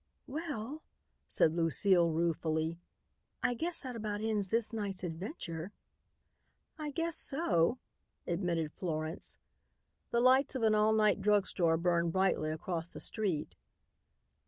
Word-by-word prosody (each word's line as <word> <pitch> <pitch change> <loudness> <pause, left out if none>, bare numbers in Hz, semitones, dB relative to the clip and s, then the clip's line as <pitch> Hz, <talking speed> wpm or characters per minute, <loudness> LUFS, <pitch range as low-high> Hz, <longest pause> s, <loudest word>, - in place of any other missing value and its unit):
"Well," 295 -2 -5 0.5
said 160 - +3
Lucile 170 +1 +4
ruefully, 160 0 0 0.6
"I 255 -1 +2
guess 335 +8 -2
that 255 -3 -6
about 210 -2 -3
ends 215 -2 0
this 230 +1 0
night's 200 -4 -3
adventure." 175 - -5 1.0
"I 305 -1 -4
guess 330 +2 -1
so," 245 - +2 0.5
admitted 170 -3 -1
Florence. 160 -1 -4 0.7
The 235 - +1
lights 260 +3 +4
of 255 - -2
an 220 -1 +4
all 215 +1 +4
night 215 -2 +3
drug 205 -1 +3
store 165 -3 +2
burned 170 -1 +1
brightly 190 -5 +2
across 165 +2 -3
the - - -6
street. 170 - -2
195 Hz, 125 wpm, -33 LUFS, 165-230 Hz, 1.0 s, Lucile